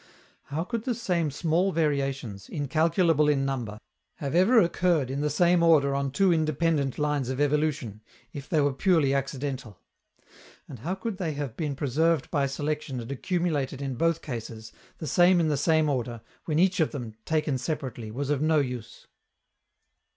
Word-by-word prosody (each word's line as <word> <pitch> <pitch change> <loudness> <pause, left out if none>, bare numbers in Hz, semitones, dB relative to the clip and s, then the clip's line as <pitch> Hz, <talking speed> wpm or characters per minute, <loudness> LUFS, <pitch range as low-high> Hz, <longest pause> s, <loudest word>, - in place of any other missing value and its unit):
How 150 +3 -3
could 230 +3 -4
the 250 -3 0
same 175 -9 0
small 170 +6 +1
variations, 135 - -2
incalculable 155 +2 +2
in 135 -2 +2
number, 120 -6 -3 0.4
have 140 -1 -4
ever 195 +8 +5
occurred 170 - +2
in 140 +2 -2
the 150 - +1
same 175 +3 +3
order 155 -5 +4
on 140 0 -1
two 185 +6 +3
independent 155 -3 0
lines 150 -4 0
of 130 0 -3
evolution, 145 -7 0 0.3
if 140 -1 -8
they 155 - +2
were 145 -1 +2
purely 155 -3 +2
accidental? 135 -5 -3 0.9
And 125 - -9
how 175 - -3
could 195 +1 -5
they 170 -5 -2
have 140 -5 -5
been 150 -4 -3
preserved 155 +2 +1
by 140 -4 +1
selection 145 -1 -3
and 120 +2 -7
accumulated 150 -3 -1
in 135 -2 -3
both 165 +5 0
cases, 115 -4 -7 0.3
the - - -6
same 175 +5 +4
in 160 -2 +2
the 150 - +1
same 155 +2 +2
order, 120 -5 -2 0.2
when 155 -2 -1
each 185 +1 +3
of 160 - +1
them, 120 -6 -5
taken 150 -4 0
separately, 130 -6 -4
was 135 +6 -3
of 145 -1 0
no 155 0 +3
use? 125 -5 -3
145 Hz, 170 wpm, -27 LUFS, 135-165 Hz, 0.9 s, ever